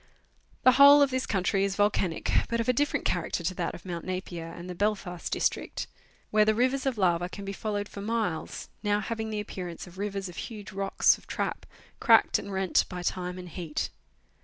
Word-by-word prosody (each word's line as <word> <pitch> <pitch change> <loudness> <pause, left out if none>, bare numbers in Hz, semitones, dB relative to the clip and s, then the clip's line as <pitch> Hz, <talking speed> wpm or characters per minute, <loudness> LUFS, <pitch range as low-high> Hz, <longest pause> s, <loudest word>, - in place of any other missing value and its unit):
The 255 - +8
whole 280 +2 +8
of 275 - +1
this 260 0 -1
country 195 -1 +1
is 195 -1 0
volcanic, 200 -4 +1 0.2
but 235 0 0
of 230 - -1
a 250 - +4
different 290 +4 0
charac - - -1
ter 170 - -1
to 180 +3 0
that - - -3
of 175 - -13
Mount 170 -2 -4
Napier 185 -3 -4
and 175 +1 -9
the 180 - -5
Belfast 195 -2 -2
District, - - -1 0.5
where 215 0 +5
the 215 0 +3
rivers 260 +3 +1
of 255 -4 0
lava 175 -2 +2
can 200 +1 -8
be 195 - -4
followed 205 0 -3
for 200 - -8
miles, 210 -7 -2
now 205 -1 +1
having 220 0 -3
the 215 -1 -2
appear 190 -3 -5
ance 170 -1 -7
of 180 +1 -13
rivers 200 -1 -3
of 175 - -10
huge 210 -3 -7
rocks 195 0 +3
of - - -22
trap, - - -3 0.3
cracked - - +5
and 200 - -7
rent 190 -1 +2
by 180 -1 -5
time 180 0 -2
and 180 -1 -8
heat. 165 -3 -3
195 Hz, 210 wpm, -28 LUFS, 180-220 Hz, 0.5 s, The